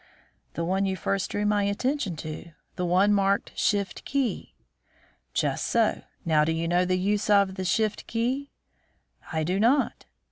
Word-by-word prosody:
"The 165 - -1
one 190 +3 +1
you 190 - -1
first 190 +1 -1
drew 205 0 -1
my 210 0 +2
attention 205 - -1
to; 155 +2 -7 0.2
the 180 - -2
one 190 +4 +4
marked 200 0 +1
'Shift 200 -2 0
key.'" 270 -7 -2 0.8
"Just - - 0
so. - - +2 0.2
Now, 155 -2 +4
do 160 - +1
you 165 +1 -1
know 175 +2 +2
the 185 0 +1
use 205 +3 0
of 200 -2 +4
the 190 0 -4
'Shift 215 +3 0
key?'" 255 +5 -1 0.8
"I 160 -1 0
do 180 +5 0
not." 255 +6 +2
195 Hz, 165 wpm, -26 LUFS, 175-210 Hz, 0.8 s, one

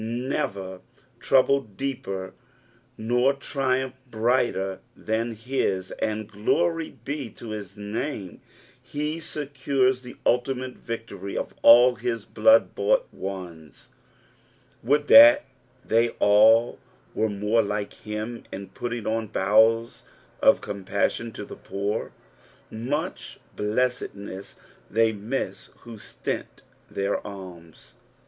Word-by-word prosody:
never 100 -6 -3 0.4
/trouble 135 -5 +2
deeper 95 -9 -4 0.6
nor 125 +4 +2
tnumph 130 -2 -1 0.2
brighter 110 -5 0 0.2
than 115 +2 -2
his, 105 -5 -2
and 110 -1 -1
glory 165 +11 0
be 140 -4 -4
to 115 +2 -10
his 105 -2 -7
name, 105 - -5 0.4
he 150 +2 -3
1 - - -8
secures 135 -4 0
the 125 -1 -11
ultimate 125 +1 0
victory 110 -5 -6
of - - -4
all 120 +2 +8
his 115 -3 -3
blood 280 0 +4
bought - - +2
ones. 90 -6 -8 0.9
Would 145 +5 +2
that 290 +1 +9 0.4
they 115 +1 +3
I - - -11
all 110 +3 +5 0.3
were 110 - 0
more 105 +3 +1
like 105 -1 -3
him 110 +2 -6
in 95 0 -7
putting 120 +1 -5
im 110 0 -1
bowels 110 +3 +3 0.4
of - - +5
compassion 100 +3 -2
to 105 - -7
the - - -9
poor. 100 +2 -3 0.6
Mech 130 +8 -3 0.2
I - - -26 0.2
blessedness 105 -3 -2 0.4
thev 110 +1 +3
miss 120 +6 -4
who 115 -3 -11
stint - - -5 0.3
their 100 +1 -1
alms. 90 -5 -11
115 Hz, 110 wpm, -25 LUFS, 100-130 Hz, 0.9 s, that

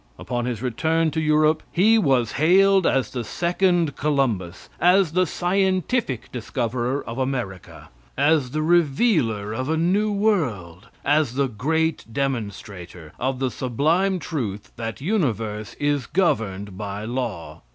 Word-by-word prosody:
Upon 120 -1 -3
his 120 -2 -4
return 160 +6 +1
to 160 - -1
Europe 155 0 +3
he 220 +6 +4
was 130 - +2
hailed 190 +5 +4
as 130 -5 +1
the 125 -2 -3
second 175 - +1
Columbus; 125 - -1
as 180 -1 +4
the 180 +1 +2
scientific 185 - 0
discoverer 125 +2 -2
of 115 +3 -6
America; 125 -9 -4 0.3
as 145 -1 +3
the 155 +4 -2
revealer 145 - +2
of 130 +5 -3
a 160 - +1
new 195 +6 +1
world; 120 - -1 0.2
as 145 -4 +2
the 140 0 +1
great 160 +8 -1
demonstrator 100 - -5
of 130 +1 -1
the 130 -1 -1
sublime 160 +12 +1
truth 110 - -5
that 115 +2 -5
universe 115 - -2
is 145 -3 -1
governed 100 - -1
by 100 0 -5
law. 115 -8 -4
135 Hz, 130 wpm, -23 LUFS, 115-165 Hz, 0.3 s, he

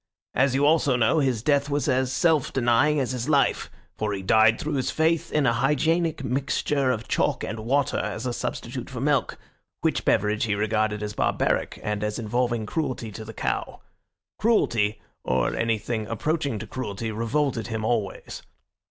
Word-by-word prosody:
As 130 +1 +2
you 140 +1 +3
also 150 -3 +3
know, 120 +6 +3
his 130 -6 0
death 145 0 +2
was 145 +2 0
as 130 -1 +1
self 160 -1 +2
denying 130 +4 +3
as 130 -2 -1
his 125 +2 -3
life, 140 -2 +2 0.3
for 105 -1 -2
he 95 -1 -4
died 110 +3 +4
through 155 0 -3
his 130 -2 0
faith 160 +1 +1
in 150 -2 +2
a 115 - +3
hygienic 155 +6 +1
mixture 135 +1 0
of 120 -2 -2
chalk - - 0
and 110 - -4
water 135 +5 +1
as 110 +3 -4
a 125 - -1
substitute - - -5
for - - -6
milk, - - +1 0.4
which - - 0
beverage 105 +2 +2
he 105 -2 0
regarded 105 0 0
as 105 0 -4
barbaric, - - 0
and 105 0 -2
as 105 0 -2
involving 120 0 -1
cruelty 125 -3 -3
to 110 +2 -8
the 110 - -8
cow. - - -3 0.6
Cruelty, 115 - +2 0.2
or 65 0 0
anything 110 -1 -1
approaching 140 +1 -1
to - - -6
cruelty, 110 -3 -4
revolted 115 +2 -1
him 110 -2 -3
always. 110 -4 -2
120 Hz, 170 wpm, -25 LUFS, 110-140 Hz, 0.6 s, died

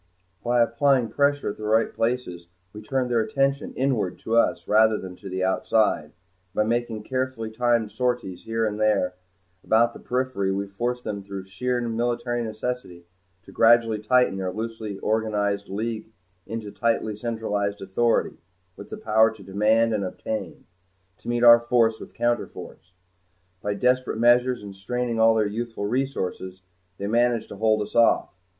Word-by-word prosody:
By 120 0 +3
applying 120 +1 +2
pressure 145 -4 +1
at - - -11
the 110 - -9
right 110 +1 +2
places 115 -8 -2 0.3
we 105 - -9
turned 125 +3 -1
their 120 - +3
attention 135 +5 0
inward 125 -8 0
to 115 - -1
us 115 - +2
rather 110 0 +4
than 95 -2 -8
to 100 - -9
the 95 0 -2
outside, 95 -2 +1
and 75 - -22 0.4
by 105 - +3
making 115 -1 -2
carefully 130 -3 -3
timed 115 -2 +1
sorties 125 -8 -2
here 115 0 0
and 105 -1 -3
there 105 -4 +2 0.5
about 115 +1 +3
the - - -11
periphery 125 -6 -1
we 100 +1 -1
forced 120 +5 -3
them 100 -2 -4
through 100 -1 -7
sheer 125 +6 -2
military 120 +1 -1
necessity 110 -5 -5 0.4
to - - -14
gradually 115 -1 +4
tighten 125 -1 +2
their 95 -1 -2
loosely 110 -1 -5
organized 105 -2 -1
League 110 +2 -4 0.4
into 110 -2 -5
tightly 115 -2 0
centralized 105 -2 -2
authority, 105 +5 0 0.4
with - - -11
the - - -6
power 110 +1 +3
to 110 - -12
demand 110 +4 +2
and 105 -2 -1
obtain 110 +3 -5 0.5
to - - -15
meet 120 0 0
our 120 0 +9
force 115 -2 +2
with - - -11
counterforce. 120 -7 -3 0.7
By 105 0 -2
desperate 125 +2 +1
measures 120 +1 +3
and 100 -1 -8
straining 120 +4 -2
of 110 - +5
all 115 - +5
their 110 -1 +2
youthful 115 0 -4
resources 100 -6 -3 0.3
they 100 - -5
managed 120 +1 +1
to 100 - -9
hold 110 0 +2
us 105 - -11
off. 115 0 +3
110 Hz, 165 wpm, -24 LUFS, 105-120 Hz, 0.7 s, our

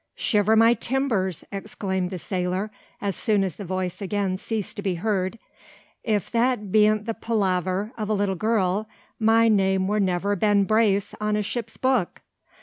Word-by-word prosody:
"Shiver 210 0 +2
my 225 +1 +6
timbers!" 230 - -1
exclaimed 195 -2 -3
the 185 - -5
sailor, 185 +3 -2 0.3
as 200 -3 -2
soon 210 -3 +1
as 185 -5 -3
the 200 - -6
voice 185 0 -3
again 195 -1 -1
ceased 215 +1 -4
to - - -3
be 190 -3 -1
heard. 190 +2 -1 0.7
"If 210 -5 -1
that 235 -4 +1
bean't 215 0 +4
the 225 - -2
palaver 195 -1 -1
o' - - -1
a 210 - -2
little 200 -2 +1
girl, 210 0 0 0.3
my 225 +1 +4
name 190 -3 +2
wur 210 +1 +1
never 190 +1 +1
Ben 205 +1 +3
Brace 205 -1 +2
on 210 0 +1
a 210 - 0
ship's 230 +2 -4
book. 255 -8 0
205 Hz, 165 wpm, -24 LUFS, 190-220 Hz, 0.7 s, my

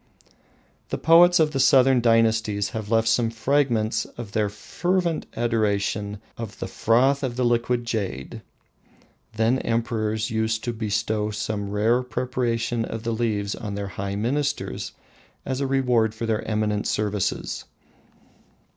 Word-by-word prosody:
The - - -2
poets 175 +2 +6
of 155 -1 +3
the 135 - -2
southern 130 -1 +5
dynasties 110 -3 +2
have 110 -2 -5
left 115 0 +2
some 115 0 +3
fragments 115 -1 +1
of 115 -4 -9
their 105 -1 0
fervent 170 - -1
adoration 105 -3 0 0.2
of 115 -3 -6
the - - -4
"froth 130 +5 +2
of 130 -3 -2
the 125 0 0
liquid 120 0 +1
jade." 100 - -4 0.9
Then 115 +4 +2
emperors 110 -2 -1
used 110 0 0
to 120 - -2
bestow 110 -1 -1
some 105 -1 -3
rare 110 +5 +2
preparation 120 -2 -1
of 115 0 -5
the 115 0 -1
leaves 105 -3 -1
on 105 -2 -5
their 100 -1 -4
high 100 0 -4
ministers 140 +7 -2 0.5
as 130 0 -2
a 135 - 0
reward 125 -5 +2
for 115 - -4 0.2
eminent 105 -1 -1
services. 105 -2 -2
115 Hz, 135 wpm, -24 LUFS, 105-125 Hz, 0.9 s, poets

